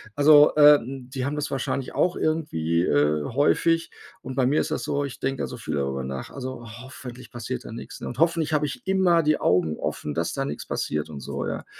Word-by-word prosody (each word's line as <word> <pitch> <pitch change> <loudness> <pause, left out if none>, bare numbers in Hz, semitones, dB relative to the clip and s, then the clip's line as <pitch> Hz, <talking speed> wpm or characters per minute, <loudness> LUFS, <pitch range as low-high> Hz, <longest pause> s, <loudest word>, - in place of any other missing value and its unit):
Also, 145 0 +7
ähm, 135 -4 +5
die 130 -2 -2
haben 145 +2 -2
das 150 -1 -3
wahrscheinlich 135 0 -2
auch 180 0 +1
irgendwie, 85 - 0
äh, 75 -2 +2
häufig 165 - +2 0.3
und 130 0 -7
bei 130 -1 +2
mir 145 +4 +3
ist - - -4
das - - -2
so, 145 0 -1
ich 130 -5 -8
denke 135 0 -2
da - - -2
so 125 - -8
viel 95 -10 -4
darüber 70 -1 -2
nach, 65 0 -5
also, 130 -3 -6 0.2
„hoffentlich 130 -1 -10
passiert 120 +1 -5
da - - -8
nichts“, 115 - -9
ne? - - -5
Und 125 - -7
„hoffentlich 165 -1 +2
habe 150 0 +2
ich 125 0 -7
immer 190 -3 +4
die 155 -1 +2
Augen 85 -4 +2
offen, 75 - -3
dass 85 0 -1
da 135 - -2
nichts - - -5
passiert“ 75 0 -2
und 75 -2 -7
so, - - -4
ja? - - -4
130 Hz, 225 wpm, -25 LUFS, 90-150 Hz, 0.3 s, Also